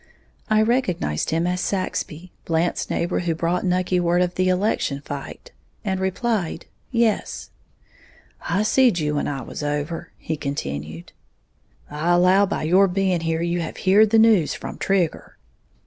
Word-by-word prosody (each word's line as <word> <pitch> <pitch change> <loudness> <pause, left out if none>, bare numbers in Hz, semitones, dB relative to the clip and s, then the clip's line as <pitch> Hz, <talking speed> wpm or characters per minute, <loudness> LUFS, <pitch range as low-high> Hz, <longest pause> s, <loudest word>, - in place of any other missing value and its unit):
I 215 0 +4
recognized 185 - 0
him 165 +1 0
as 180 0 -1
Saxby, 185 -3 -3
Blant's 165 +1 0
neighbor 175 +1 -1
who 170 -2 -1
brought 170 +2 -1
Nucky 180 0 +1
word 175 +1 +2
of 180 0 -2
the 185 0 +1
election 185 -7 0
fight, 145 - -8 0.3
and 190 -2 -1
replied, 190 -2 -1 0.2
"Yes." 230 -3 -1 1.0
"I 200 - +2
seed 240 -2 +3
you 150 -2 -1
when 145 - -1
I 135 -3 -3
was - - -7
over," 150 +2 -3
he 160 - -4
continued. 80 - -5 0.8
"I 155 +4 0
allow 185 +3 +4
by - - -3
your 185 +5 +4
being 190 -1 0
here 165 0 -1
you 175 0 -1
have 160 - -6
heared 205 +3 +4
the 225 - +4
news 220 -8 +4
from - - -8
Trigger." 185 -5 -1
180 Hz, 150 wpm, -22 LUFS, 160-195 Hz, 1.0 s, I